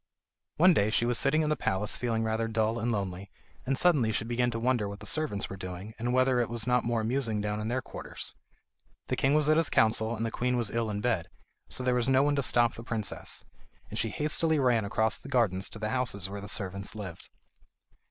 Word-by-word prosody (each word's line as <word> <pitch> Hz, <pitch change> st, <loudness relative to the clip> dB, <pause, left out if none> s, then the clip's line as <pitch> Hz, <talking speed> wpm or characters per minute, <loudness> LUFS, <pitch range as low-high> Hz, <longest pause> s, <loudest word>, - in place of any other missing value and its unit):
One 180 Hz, +3 st, +7 dB
day 105 Hz, -8 st, +2 dB
she 115 Hz, +2 st, +2 dB
was 120 Hz, -1 st, +2 dB
sitting 155 Hz, +3 st, +3 dB
in 150 Hz, -, 0 dB
the 155 Hz, -, +2 dB
palace 105 Hz, -5 st, -1 dB
feeling 115 Hz, -2 st, -1 dB
rather 110 Hz, 0 st, 0 dB
dull 110 Hz, +1 st, 0 dB
and 120 Hz, +2 st, 0 dB
lonely, 95 Hz, -2 st, -3 dB, 0.4 s
and 135 Hz, 0 st, +1 dB
suddenly 145 Hz, -11 st, +4 dB
she 110 Hz, +1 st, -1 dB
began 120 Hz, +1 st, +1 dB
to 115 Hz, -, -3 dB
wonder 120 Hz, -4 st, +1 dB
what 100 Hz, 0 st, -8 dB
the 105 Hz, -, -10 dB
servants 150 Hz, -7 st, 0 dB
were 95 Hz, -, -7 dB
doing, 95 Hz, +3 st, -7 dB
and 120 Hz, +2 st, -1 dB
whether 130 Hz, 0 st, +3 dB
it 120 Hz, -, 0 dB
was 115 Hz, -2 st, -2 dB
not 125 Hz, -1 st, +2 dB
more 120 Hz, -1 st, 0 dB
amusing 115 Hz, -1 st, 0 dB
down 105 Hz, 0 st, -2 dB
in 105 Hz, -, -3 dB
their 130 Hz, +3 st, -1 dB
quarters. -, -, -7 dB, 0.8 s
The -, -, +1 dB
king 135 Hz, +2 st, +2 dB
was 150 Hz, -1 st, +3 dB
at 155 Hz, 0 st, +5 dB
his 165 Hz, -2 st, +3 dB
council 110 Hz, +1 st, +2 dB
and 115 Hz, -, -2 dB
the 115 Hz, -, -2 dB
queen 125 Hz, +2 st, 0 dB
was 115 Hz, -4 st, 0 dB
ill 115 Hz, -1 st, -1 dB
in 105 Hz, -1 st, -3 dB
bed, 100 Hz, -8 st, 0 dB, 0.4 s
so 130 Hz, -, 0 dB
there 125 Hz, 0 st, +2 dB
was 125 Hz, +1 st, +1 dB
no 135 Hz, +1 st, +5 dB
one 145 Hz, 0 st, +2 dB
to 140 Hz, -, +1 dB
stop 120 Hz, -3 st, +3 dB
the 115 Hz, -, -9 dB
princess, 110 Hz, -3 st, -4 dB, 0.5 s
and -, -, -3 dB
she 115 Hz, -, 0 dB
hastily 155 Hz, +4 st, +1 dB
ran 120 Hz, -6 st, +2 dB
across 110 Hz, +2 st, 0 dB
the 135 Hz, -, -11 dB
gardens 110 Hz, -8 st, +1 dB
to -, -, -9 dB
the 110 Hz, 0 st, -3 dB
houses 110 Hz, -6 st, -1 dB
where 100 Hz, +1 st, -6 dB
the 100 Hz, -, -7 dB
servants 100 Hz, 0 st, -3 dB
lived. 95 Hz, -6 st, -8 dB
115 Hz, 235 wpm, -29 LUFS, 105-130 Hz, 0.8 s, One